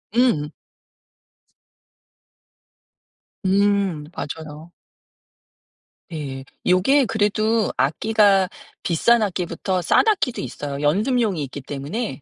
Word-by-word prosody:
음. 230 -13 +2 3.0
음 195 -5 +2
맞아요. 155 +2 -7 1.4
예. 135 -3 -6 0.2
요게 235 +11 +4
그래도 215 +1 +1
악기가 200 +4 +3 0.4
비싼 230 +8 +3
악기부터 185 -1 -2
싼 175 - +3
악기도 370 - +1
있어요. 140 +3 -5
연습용이 205 - +1
있기 140 +2 -8
때문에. 145 - -5
185 Hz, 175 characters per minute, -22 LUFS, 150-220 Hz, 3.0 s, 요게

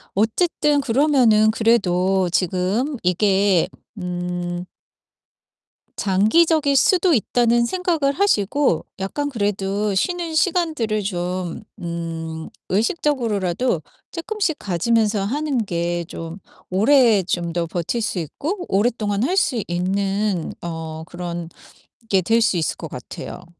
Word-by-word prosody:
어쨌든 290 - +2
그러면은 240 -5 +4
그래도 190 -5 +2
지금 190 - 0
이게 190 0 +3 0.3
음 175 -1 -4 1.3
장기적일 280 - +3
수도 360 +5 +4
있다는 235 0 +2
생각을 330 -3 0
하시고 280 - +1
약간 285 +10 -2
그래도 205 -3 -1
쉬는 340 - -1
시간들을 310 - +1
좀 180 -1 -3 0.2
음 165 -1 -5 0.2
의식적으로라도 225 - 0 0.3
쪼끔씩 365 -2 -2
가지면서 210 +2 +1
하는 275 +2 -1
게 170 -1 -2
좀 165 +3 -7 0.3
오래 220 +1 +4
좀 170 -2 -2
더 170 0 0
버틸 175 +8 -2
수 205 - -1
있고 320 - -4
오랫동안 210 0 +1
할 350 +8 +1
수 245 - +2
있는 195 +1 -1
어 160 -1 -5
그런 175 -1 -6 0.6
게 190 -2 +3
될 225 +6 +3
수 225 -5 +2
있을 160 - -1
것 - - -7
같아요. - - -8
205 Hz, 230 characters per minute, -21 LUFS, 180-265 Hz, 1.3 s, 그러면은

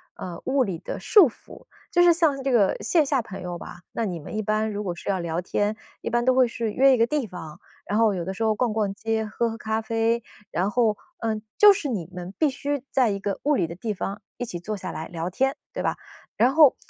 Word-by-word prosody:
呃， 175 -2 -7
物 265 0 +3
理 190 -7 -3
的 - - -6
束 390 - +6
缚， - - -15 0.3
就 350 -4 +4
是 350 0 +7
像 315 -5 +2
这 270 0 0
个 210 -6 +4
线 325 -4 +3
下 270 -3 +1
朋 195 -4 -8
友 175 -1 -5
吧， 175 - -10
那 230 - -2
你 180 -5 -3
们 155 - -8
一 215 - 0
般 215 +1 0
如 205 +1 -3
果 180 -3 -3
是 - - -11
要 195 -2 +1
聊 170 0 -2
天 205 +4 -1 0.2
一 - - -3
般 240 0 +1
都 255 - +5
会 255 -1 +5
是 230 -1 -3
约 270 +5 +5
一 - - +3
个 230 - +4
地 280 -1 -1
方， 170 -5 -9 0.3
然 205 +2 0
后 220 -3 +4
有 175 -2 -3
的 190 - -3
时 215 +4 -3
候 220 -1 +2
逛 230 0 0
逛 210 -3 0
街、 220 +1 -1
喝 230 +2 -1
喝 225 - -6
咖 220 0 -1
啡， 230 +1 +1 0.3
然 190 +4 0
后， 220 -2 +2 0.2
呃， 220 -2 -1 0.2
就 420 0 +10
是 340 -8 -3
你 190 -8 -3
们 180 +1 -7
必 310 - +4
须 280 0 -3
在 255 -4 +3
一 200 - -2
个 200 -1 -3
物 295 +1 +3
理 175 -9 +1
的 170 - -7
地 215 +4 -3
方 200 +2 -4 0.2
一 245 - -3
起 175 -6 -5
坐 215 +4 -4
下 185 -3 -5
来 160 - -5
聊 170 0 -3
天， 265 +9 0 0.2
对 - - -3
吧？ - - 0 0.4
然 250 +4 +4
后， 305 -4 +7
220 Hz, 275 characters per minute, -25 LUFS, 190-255 Hz, 0.4 s, 就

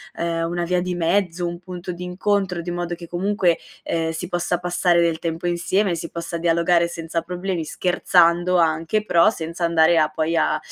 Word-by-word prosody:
ehm, 165 0 -1
una 175 0 -2
via 180 +1 0
di 180 0 -3
mezzo, 175 0 0
un 170 0 -5
punto 180 0 -7
d'incontro, 180 +1 -1
di 175 +1 -5
modo 175 0 -3
che, 170 -1 -11
comunque, 180 0 +1 0.3
ehm, 165 -1 -1
si 165 +2 -5
possa 175 0 -1
passare 175 -1 +2
del 165 -1 +1
tempo 165 +1 -3
insieme, 175 +2 +1
si 165 0 -6
possa 170 0 -5
dialogare 170 +1 +2
senza 165 -1 -4
problemi, 180 -1 -3
scherzando 175 +1 +2
anche, 165 +5 +1
però 170 -2 +4
senza 170 -4 -4
andare 165 0 +4
a 155 -1 +4
poi 160 +1 -1
a, - - +2
175 Hz, 180 wpm, -22 LUFS, 165-180 Hz, 0.3 s, però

